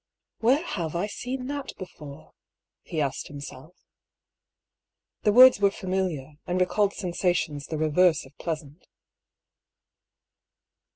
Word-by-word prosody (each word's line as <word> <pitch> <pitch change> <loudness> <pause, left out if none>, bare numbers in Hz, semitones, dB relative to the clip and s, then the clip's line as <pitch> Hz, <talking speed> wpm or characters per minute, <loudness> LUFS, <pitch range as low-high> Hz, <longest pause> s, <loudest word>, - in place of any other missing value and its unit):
"Where 265 +9 +3
have 170 - -3
I 175 +4 0
seen 250 +4 -5
that 280 0 -5
before?" 150 -6 -11 0.5
he 160 - -5
asked 140 -2 -2
him 145 - -8
self. 140 +4 -10 1.5
The 210 - +3
words 255 +1 +8
were 200 -1 +5
familiar, 185 -8 -3
and 180 +1 0
recalled 200 +2 +2
sensations 175 -6 -1
the 155 - -3
reverse 155 +1 +3
of 135 +2 -18
pleasant. 155 -2 -6
180 Hz, 115 wpm, -26 LUFS, 150-205 Hz, 1.5 s, words